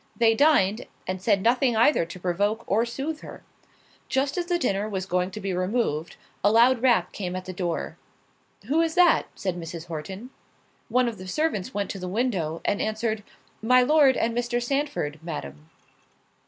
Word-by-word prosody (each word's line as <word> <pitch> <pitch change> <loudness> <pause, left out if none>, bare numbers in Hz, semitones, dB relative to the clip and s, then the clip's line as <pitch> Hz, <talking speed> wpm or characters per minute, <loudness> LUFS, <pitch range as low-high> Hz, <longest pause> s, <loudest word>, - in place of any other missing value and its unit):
They 230 -1 +4
dined, 225 -6 +3 0.2
and 185 0 -4
said 200 -1 +2
nothing 245 0 +3
either 230 - +4
to 175 +2 -9
provoke 205 +6 0
or 225 +4 +1
sooth 280 +6 -4
her. - - -11 0.7
Just 270 +1 0
as 350 -1 -2
the 350 -1 +1
dinner 210 - -1
was 190 -3 -3
going 180 -1 0
to 215 - -8
be 195 -2 -3
removed, 180 -4 -1 0.3
a 205 - +5
loud 235 +2 +5
rap 235 -9 +3
came 185 -3 -4
at 185 - -5
the 185 - -6
door—"Who 195 - -4
is 325 -1 0
that?" 355 -2 +5
said 185 -3 -3
Mrs. 165 -1 -7
Horton. 190 +9 -7 0.6
One 250 +2 +2
of 225 -4 -4
the 185 - -8
servants 210 - -1
went 205 -1 -1
to 195 - -6
the 180 - -5
window, 185 -7 -1
and 205 - 0
answered, 220 0 -1 0.4
"My 250 +3 +5
Lord 285 -1 +5
and 230 0 0
Mr. 240 0 0
Sandford, 245 - -2
Madam." 75 - -7
215 Hz, 175 wpm, -25 LUFS, 185-250 Hz, 0.7 s, a